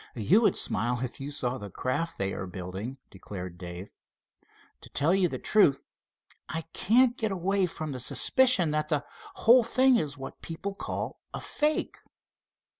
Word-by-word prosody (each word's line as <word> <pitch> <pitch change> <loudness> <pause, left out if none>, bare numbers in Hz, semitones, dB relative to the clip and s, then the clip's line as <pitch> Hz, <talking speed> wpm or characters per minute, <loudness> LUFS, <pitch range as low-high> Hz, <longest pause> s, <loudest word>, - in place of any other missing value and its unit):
"You 150 - +4
would 225 - +3
smile 120 +4 -1
if 125 - -5
you 135 +1 -5
saw 130 -3 -2
the 105 - -7
craft 145 - -2
they 95 0 -1
are 95 - -5
building," 95 +8 -6
declared 90 -2 -8
Dave. 90 +2 -8 0.9
"To - - -12
tell 150 +5 +2
you 190 -2 +3
the - - -4
truth, 140 -10 +3 0.7
I 165 0 -2
can't 240 +4 +4
get 220 -4 -1
away 195 +1 +1
from 155 -3 -5
the 130 - -5
suspicion 195 - +3
that 155 0 -1
the 150 -2 0 0.3
whole 240 +2 +6
thing 255 +2 +4
is 145 -7 -2
what 135 - -9
people 185 +5 -5
call - - -5 0.2
a - - -4
fake." 300 +1 -1
150 Hz, 165 wpm, -28 LUFS, 120-200 Hz, 0.9 s, whole